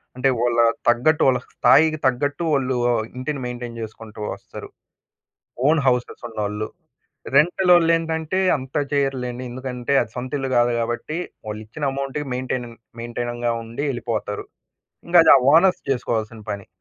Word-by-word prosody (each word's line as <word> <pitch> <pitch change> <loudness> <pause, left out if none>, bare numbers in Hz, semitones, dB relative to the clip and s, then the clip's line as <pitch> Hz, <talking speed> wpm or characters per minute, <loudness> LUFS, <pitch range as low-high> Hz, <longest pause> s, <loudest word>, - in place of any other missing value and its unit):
అంటే 130 +1 +2
వాళ్ళ 120 -1 +1 0.3
తగ్గట్టు 135 +7 +3
వాళ్ళ 125 -2 +3
స్థాయికి 155 +5 +4
తగ్గట్టు 145 +5 -1
వాళ్ళు 130 -2 +1 0.2
ఆహ్, 110 - 0
ఇంటిని 140 +2 -3
మెయింటైన్ 120 -1 -6
చేసుకుంటూ 110 -1 -9
వస్తరు. - - -10 1.0
ఓన్ 155 -1 +4
హౌసెస్ 125 -1 0
ఉన్నోళ్ళు. 105 -1 -3 0.7
రెంటలోల్లేంటంటే 165 0 +3 0.2
అంత 130 0 -10 0.2
చెయ్యరులెండి. 130 -3 -1
ఎందుకంటే 125 +1 -3
అది - - -5
సొంత 125 +1 -5
ఇల్లు 135 -1 -3
కాదు 120 0 +3
కాబట్టి 120 +7 -3 0.3
వాళ్ళిచ్చిన 110 +7 -7
అమౌంట్‌కి 140 +2 -4
మేయిన్‌టైనింగ్- 125 -2 -4 0.2
మేయిన్‌టైనింగ్‌గా 120 0 -3
ఉండి 115 +5 -5
ఎళ్ళిపోతారు. 110 -4 -3 0.6
ఇంకా 175 0 +7
ఆ - - +9 0.2
ఓనర్స్ 185 +2 +5
చేసుకోవాల్సిన 115 -3 -2
పని. 100 -1 -5
125 Hz, 125 wpm, -22 LUFS, 120-145 Hz, 1.0 s, ఆ